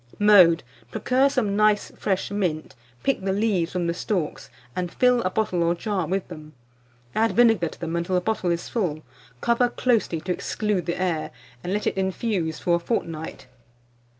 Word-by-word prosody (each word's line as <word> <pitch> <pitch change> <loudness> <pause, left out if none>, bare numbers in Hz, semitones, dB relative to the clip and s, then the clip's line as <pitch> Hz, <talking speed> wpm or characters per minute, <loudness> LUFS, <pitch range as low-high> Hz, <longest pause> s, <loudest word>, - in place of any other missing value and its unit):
Mode. 185 -5 +6 0.3
Procure 260 - +2
some 225 -7 0
nice 210 0 +2
fresh 190 -1 -2
mint, 180 -7 -2 0.3
pick 275 -6 +1
the 190 0 -1
leaves 195 -4 +1
from 180 -1 -1
the 170 - 0
stalks, 180 -3 -3 0.3
and 180 -1 -2
fill 250 -1 +3
a 185 - 0
bottle 190 -3 0
or 170 +1 +2
jar 190 -2 -2
with 190 +1 -2
them. 155 -3 -11 0.6
Add 225 +1 +2
vinegar 225 -8 +4
to - - -14
them 170 0 -3
until 170 +2 -1
the 180 - +2
bottle 195 -2 -1
is 170 0 -1
full; 165 -9 -2 0.4
cover 235 +1 +2
closely 230 -9 +1
to 180 - -3
exclude 200 -2 -2
the 170 - -2
air, 175 -4 -1 0.3
and 180 - -3
let 210 +2 -1
it - - -1
infuse 190 -3 -1
for 175 -1 +1
a - - -5
fortnight. 165 - -4
185 Hz, 180 wpm, -24 LUFS, 170-215 Hz, 0.6 s, Mode